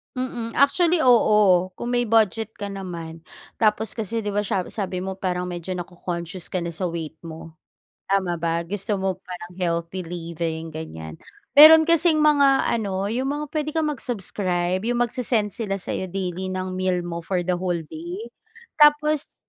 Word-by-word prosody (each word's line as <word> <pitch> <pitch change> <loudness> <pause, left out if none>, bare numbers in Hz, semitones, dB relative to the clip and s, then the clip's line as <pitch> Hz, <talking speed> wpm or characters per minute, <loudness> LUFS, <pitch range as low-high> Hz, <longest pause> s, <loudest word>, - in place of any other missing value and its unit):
Mm, 245 -3 -4
actually 330 +4 +3
oo, 210 -7 +5
kung 240 +5 -4
may 245 -1 +1
budget 220 0 +2
ka 200 -1 -5
naman, 170 -4 -7 0.4
tapos 215 -1 +2
kasi 225 0 -3
di 205 - -2
ba 205 - 0
siya 200 -2 -1
sabi 185 -3 -3
mo 190 0 -5
parang 180 -2 -1
medyo 180 0 -5
naco-conscious 175 0 -5
ka 180 -2 -3
na 170 - -3
sa 180 +2 -2
weight 160 -2 -6
mo, 165 0 -10 0.6
tama 185 -3 0
ba? 165 0 -1
Gusto 205 +4 -2
mo 190 -1 -2
parang 180 -2 -9
healthy 170 0 -2
living 165 -1 -4
ganiyan. 80 - -8 0.3
Meron 315 +2 +10
kasing 330 -1 +3
mga 280 -3 +4
ano, 200 -3 -1
yung 255 +3 -1
mga 295 +2 -2
puwede 305 -1 -2
kang 315 -2 +1
mag-subscribe, 185 -8 -2
yung 240 0 +2
mag-se-send 235 -3 0
sila 210 -4 -2
sayo 190 0 -2
daily 185 0 -4
ng 185 0 -4
meal 185 -1 0
mo 170 -1 -5
for 175 +1 -2
the 180 - -1
whole 175 -2 -2
day, 350 +8 -7 0.5
tapos 300 0 +4
190 Hz, 165 wpm, -23 LUFS, 175-240 Hz, 0.6 s, Meron